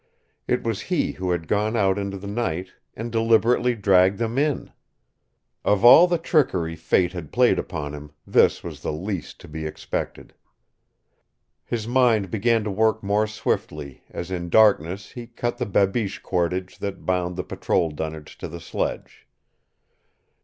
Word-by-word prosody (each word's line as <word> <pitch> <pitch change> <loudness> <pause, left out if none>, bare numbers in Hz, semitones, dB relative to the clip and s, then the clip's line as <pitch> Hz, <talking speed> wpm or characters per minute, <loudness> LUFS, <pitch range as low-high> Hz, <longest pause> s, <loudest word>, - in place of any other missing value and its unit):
It 125 - 0
was 115 -3 -2
he 180 -4 +1
who 90 0 -4
had 85 -2 -1
gone 105 +2 0
out 95 -2 +2
into 100 -1 -4
the 95 - -10
night 95 -4 -3 0.2
and 115 +2 -5
deliberately 115 +2 +3
dragged 95 -2 +4
them 115 +2 -1
in! 150 -1 -1 0.9
Of 105 +2 +2
all 165 +9 +9
the 175 -1 +1
trickery 95 - +1
fate 85 +2 +1
had 85 -5 -7
played - - +3
upon 75 -1 -5
him 75 0 -8 0.2
this - - +3
was - - -8
the - - -2
least 90 +3 -5
to - - -12
be 80 +1 -6
expected. 75 - -5 1.3
His 115 -2 -4
mind 120 -6 +2
began 115 +1 +2
to 105 - -3
work 110 +2 +1
more 105 +2 +1
swiftly 75 -9 -3
as 85 +2 -6
in 85 -2 -3
darkness 100 -2 +3
he 120 -1 -8
cut 120 +1 -4
the 125 - -1
babiche 100 +1 0
cordage 90 +1 -2
that 100 -1 -5
bound 90 -1 0
the 90 - -3
patrol 85 -3 -1
dunnage 80 0 -7
to - - -5
the 85 +2 -8
sledge. 80 - -4
100 Hz, 160 wpm, -23 LUFS, 90-115 Hz, 1.3 s, all